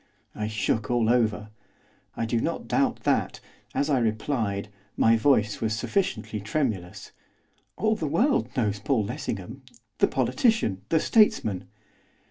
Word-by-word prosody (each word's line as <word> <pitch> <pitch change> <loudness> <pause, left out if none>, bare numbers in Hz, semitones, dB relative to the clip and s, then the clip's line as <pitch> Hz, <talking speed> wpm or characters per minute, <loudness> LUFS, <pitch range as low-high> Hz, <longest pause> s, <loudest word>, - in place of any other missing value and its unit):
I 105 0 -3
shook 110 0 -1
all 120 -2 +2
over. 110 -3 +1 0.7
I 115 - -1
do 115 0 0
not - - -3
doubt - - +1
that, - - 0 0.4
as 145 - +1
I 140 -4 +2
replied, 110 -3 -1 0.3
my 115 0 +5
voice 110 -3 +2
was 110 -1 0
sufficiently 185 - -1
tremulous. 105 -5 -3 0.7
'All 220 0 +2
the 160 - -3
world 240 - +2
knows 105 -4 0
Paul 115 +2 +1
Lessingham, 110 +5 -5 0.4
the - - +5
politician, 220 - +1
the 160 - +3
statesman. 110 - +2
115 Hz, 130 wpm, -26 LUFS, 105-140 Hz, 0.7 s, my